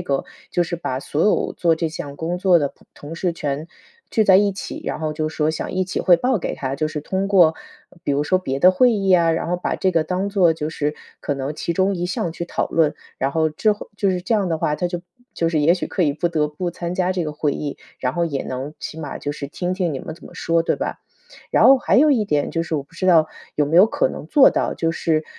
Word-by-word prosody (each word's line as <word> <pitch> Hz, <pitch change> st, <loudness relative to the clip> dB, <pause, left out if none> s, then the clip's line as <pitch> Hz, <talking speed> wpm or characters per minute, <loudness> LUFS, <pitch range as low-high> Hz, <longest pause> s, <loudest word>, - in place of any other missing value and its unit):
个， 140 Hz, -6 st, -1 dB, 0.3 s
就 175 Hz, -, +1 dB
是 175 Hz, +1 st, -3 dB
把 130 Hz, -6 st, -3 dB
所 150 Hz, +3 st, -2 dB
有 210 Hz, -, +2 dB
做 170 Hz, -2 st, +2 dB
这 160 Hz, -1 st, -2 dB
项 145 Hz, -4 st, -7 dB
工 170 Hz, +3 st, -3 dB
作 185 Hz, -2 st, +5 dB
的 145 Hz, -2 st, 0 dB
朋 -, -, -23 dB
同 150 Hz, +3 st, -9 dB
事 170 Hz, 0 st, -1 dB
全 150 Hz, +1 st, -3 dB, 0.4 s
聚 220 Hz, -, +2 dB
在 190 Hz, -1 st, +7 dB
一 205 Hz, +1 st, +4 dB
起， 190 Hz, -, -7 dB
然 -, -, -3 dB
后 155 Hz, -1 st, -2 dB
就 155 Hz, 0 st, -2 dB
说 155 Hz, 0 st, 0 dB
想 160 Hz, -, -4 dB
一 185 Hz, 0 st, 0 dB
起 185 Hz, -, -3 dB
汇 175 Hz, -2 st, +5 dB
报 250 Hz, +4 st, +1 dB
给 -, -, -3 dB
他。 135 Hz, 0 st, -3 dB
就 155 Hz, +2 st, -1 dB
是 155 Hz, -, -4 dB
通 190 Hz, +6 st, -2 dB
过， 175 Hz, -5 st, +5 dB, 0.5 s
比 145 Hz, -, 0 dB
如 145 Hz, +1 st, +1 dB
说 185 Hz, +4 st, +2 dB
别 135 Hz, -7 st, -3 dB
的 180 Hz, +5 st, +7 dB
会 245 Hz, +6 st, +4 dB
议 195 Hz, -2 st, -1 dB
呀， 170 Hz, -3 st, +5 dB
然 165 Hz, -, -2 dB
后 180 Hz, -, 0 dB
把 180 Hz, -, -2 dB
这 190 Hz, -, +1 dB
个 165 Hz, -3 st, +1 dB
当 185 Hz, +4 st, -1 dB
做 185 Hz, -5 st, +4 dB
就 155 Hz, -1 st, -4 dB
是 150 Hz, -1 st, -2 dB, 0.3 s
可 145 Hz, -, -2 dB
能 135 Hz, +2 st, -4 dB
其 170 Hz, -, -2 dB
中 190 Hz, +3 st, +1 dB
一 175 Hz, -1 st, -2 dB
项 180 Hz, -4 st, -2 dB
去 170 Hz, -, -5 dB
讨 -, -, -2 dB
论。 160 Hz, -3 st, +2 dB, 0.2 s
然 135 Hz, +1 st, 0 dB
后 160 Hz, +1 st, +1 dB
之 210 Hz, +7 st, +2 dB
后 205 Hz, -, -9 dB
就 200 Hz, -2 st, +1 dB
是 180 Hz, -1 st, -1 dB
这 225 Hz, +5 st, 0 dB
样 200 Hz, -4 st, +1 dB
的 160 Hz, -, 0 dB
话， 150 Hz, -, 0 dB
他 180 Hz, -, -1 dB
就 175 Hz, 0 st, -4 dB, 0.3 s
就 165 Hz, -, 0 dB
是 160 Hz, -2 st, 0 dB
也 160 Hz, +4 st, +5 dB
许 180 Hz, -, -2 dB
可 185 Hz, -, -1 dB
以 145 Hz, -3 st, +2 dB
不 170 Hz, +4 st, -1 dB
得 155 Hz, -3 st, +1 dB
不 175 Hz, +4 st, -4 dB
参 175 Hz, 0 st, -5 dB
加 185 Hz, 0 st, +1 dB
这 180 Hz, -3 st, -2 dB
个 150 Hz, -, -4 dB
会 150 Hz, -1 st, -1 dB
议， 145 Hz, -2 st, -5 dB, 0.2 s
然 125 Hz, 0 st, -1 dB
后 170 Hz, 0 st, 0 dB
也 140 Hz, -4 st, -3 dB
能 135 Hz, +4 st, -5 dB
起 160 Hz, -, -7 dB
码 145 Hz, -3 st, -5 dB
就 145 Hz, -, -4 dB
是 145 Hz, -1 st, -6 dB
听 175 Hz, +5 st, -3 dB
听 180 Hz, -5 st, -1 dB
你 135 Hz, -, -3 dB
们 160 Hz, -, -7 dB
怎 170 Hz, -, -20 dB
么 -, -, -14 dB
说， 165 Hz, 0 st, +1 dB
对 -, -, 0 dB
吧？ -, -, -4 dB, 0.5 s
然 -, -, +4 dB
后 270 Hz, 0 st, +8 dB
还 -, -, +2 dB
有 300 Hz, +3 st, +6 dB
一 220 Hz, -7 st, +2 dB
点， 145 Hz, -4 st, 0 dB
就 165 Hz, -, -1 dB
是 165 Hz, -1 st, -4 dB
我 145 Hz, -, -1 dB
不 145 Hz, -, -28 dB
知 185 Hz, +2 st, -3 dB
道 165 Hz, -3 st, +6 dB, 0.3 s
有 150 Hz, -, +2 dB
没 160 Hz, +4 st, 0 dB
有 200 Hz, -, +8 dB
可 -, -, +1 dB
能 150 Hz, -, -6 dB
做 275 Hz, -, +6 dB
到， -, -, -1 dB
就 165 Hz, 0 st, -1 dB
是 160 Hz, -2 st, 0 dB
165 Hz, 300 characters per minute, -21 LUFS, 150-185 Hz, 0.5 s, 后